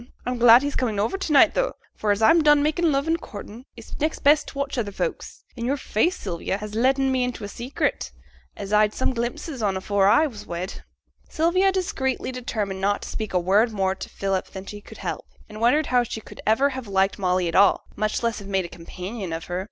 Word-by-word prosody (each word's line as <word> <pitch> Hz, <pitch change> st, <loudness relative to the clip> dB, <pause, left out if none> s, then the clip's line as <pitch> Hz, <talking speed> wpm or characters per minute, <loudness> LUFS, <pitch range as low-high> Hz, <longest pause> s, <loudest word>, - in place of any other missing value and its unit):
I'm 250 Hz, -1 st, -2 dB
glad 240 Hz, +2 st, +8 dB
he's 285 Hz, 0 st, -2 dB
comin' 225 Hz, -5 st, -1 dB
to 310 Hz, -, -1 dB
night 300 Hz, +2 st, +6 dB
tho', -, -, 0 dB, 0.2 s
for 215 Hz, -, -2 dB
as 205 Hz, +2 st, 0 dB
I'm 325 Hz, +8 st, +6 dB
done 295 Hz, -1 st, +5 dB
makin' 315 Hz, +2 st, +1 dB
love 275 Hz, 0 st, +1 dB
and 330 Hz, 0 st, 0 dB
courtin', 215 Hz, +4 st, -10 dB
it's 230 Hz, -, -10 dB
next 310 Hz, +2 st, -1 dB
best 295 Hz, +1 st, +4 dB
t' -, -, -9 dB
watch 280 Hz, 0 st, -2 dB
other 205 Hz, -3 st, -2 dB
folks; 475 Hz, -, -4 dB
an' 235 Hz, -, -6 dB
yo'r 275 Hz, +3 st, 0 dB
face, 310 Hz, -, 0 dB
Sylvia, 185 Hz, 0 st, -3 dB
has 210 Hz, 0 st, -7 dB
letten 265 Hz, +4 st, +2 dB
me 260 Hz, -1 st, +1 dB
into 250 Hz, -3 st, -4 dB
a -, -, -4 dB
secret, 240 Hz, +6 st, -3 dB, 0.5 s
as 200 Hz, 0 st, -5 dB
I'd 210 Hz, 0 st, +3 dB
some 260 Hz, -, 0 dB
glimpses 245 Hz, +3 st, -4 dB
on 195 Hz, -3 st, 0 dB
afore 195 Hz, +1 st, +1 dB
I 300 Hz, +10 st, +5 dB
was 215 Hz, -8 st, -7 dB
wed.' 175 Hz, +2 st, -5 dB, 0.5 s
Sylvia 365 Hz, +4 st, +2 dB
secretly 265 Hz, -5 st, -2 dB
determined 215 Hz, -6 st, -4 dB
not 200 Hz, +1 st, 0 dB
to -, -, -7 dB
speak 220 Hz, -2 st, -4 dB
a -, -, +4 dB
word 200 Hz, +6 st, +3 dB
more 190 Hz, -2 st, +1 dB
to -, -, -8 dB
Philip 195 Hz, -1 st, -2 dB
than 190 Hz, 0 st, -9 dB
she 205 Hz, +1 st, -8 dB
could -, -, -13 dB
help, -, -, -4 dB, 0.2 s
and 215 Hz, 0 st, -10 dB
wondered 290 Hz, +7 st, +3 dB
how 250 Hz, -1 st, +3 dB
she 230 Hz, -2 st, -4 dB
could -, -, -12 dB
ever 260 Hz, +6 st, +4 dB
have 260 Hz, -4 st, -6 dB
liked 195 Hz, 0 st, +1 dB
Molly 180 Hz, -2 st, +1 dB
at 165 Hz, -, -3 dB
all, 200 Hz, +3 st, +4 dB
much 215 Hz, +2 st, -1 dB
less 230 Hz, -1 st, 0 dB
have 200 Hz, -, -10 dB
made 190 Hz, -2 st, 0 dB
a -, -, -8 dB
companion 185 Hz, +3 st, -7 dB
of 165 Hz, 0 st, -4 dB
her. 175 Hz, +1 st, -3 dB
225 Hz, 230 wpm, -24 LUFS, 200-270 Hz, 0.5 s, glad